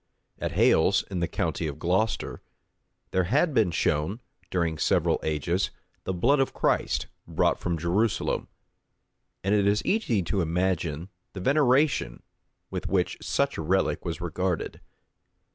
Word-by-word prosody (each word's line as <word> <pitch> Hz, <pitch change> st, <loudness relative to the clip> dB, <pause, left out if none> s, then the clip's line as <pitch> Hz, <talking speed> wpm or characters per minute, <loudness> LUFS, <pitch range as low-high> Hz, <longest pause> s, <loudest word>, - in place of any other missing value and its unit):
At -, -, -3 dB
Hales, 95 Hz, +4 st, +4 dB
in 95 Hz, -, -2 dB
the 85 Hz, -, 0 dB
county 80 Hz, -, -2 dB
of 70 Hz, -1 st, -5 dB
Glocester, 95 Hz, +7 st, -1 dB, 0.7 s
there 95 Hz, -1 st, +2 dB
had 145 Hz, -, +2 dB
been 110 Hz, -7 st, +3 dB
shown, 80 Hz, +4 st, 0 dB, 0.3 s
during 85 Hz, -4 st, -1 dB
several -, -, +2 dB
ages, 80 Hz, +5 st, 0 dB, 0.4 s
the -, -, -1 dB
blood 120 Hz, +11 st, +3 dB
of 135 Hz, -, 0 dB
Christ, -, -, +1 dB, 0.2 s
brought -, -, +1 dB
from 85 Hz, -1 st, -1 dB
Jerusalem; 90 Hz, +5 st, 0 dB, 1.0 s
and 95 Hz, +2 st, +1 dB
it 100 Hz, -1 st, +3 dB
is 105 Hz, +1 st, +1 dB
easy 125 Hz, -, +1 dB
to 95 Hz, +3 st, 0 dB
imagine 85 Hz, -1 st, -1 dB, 0.2 s
the 95 Hz, -, -6 dB
veneration 135 Hz, -, +2 dB, 0.5 s
with -, -, -4 dB
which -, -, 0 dB
such -, -, 0 dB
a -, -, -1 dB
relic 95 Hz, +4 st, +1 dB
was 85 Hz, -3 st, -4 dB
regarded. 90 Hz, 0 st, -2 dB
95 Hz, 140 wpm, -27 LUFS, 85-105 Hz, 1.0 s, Hales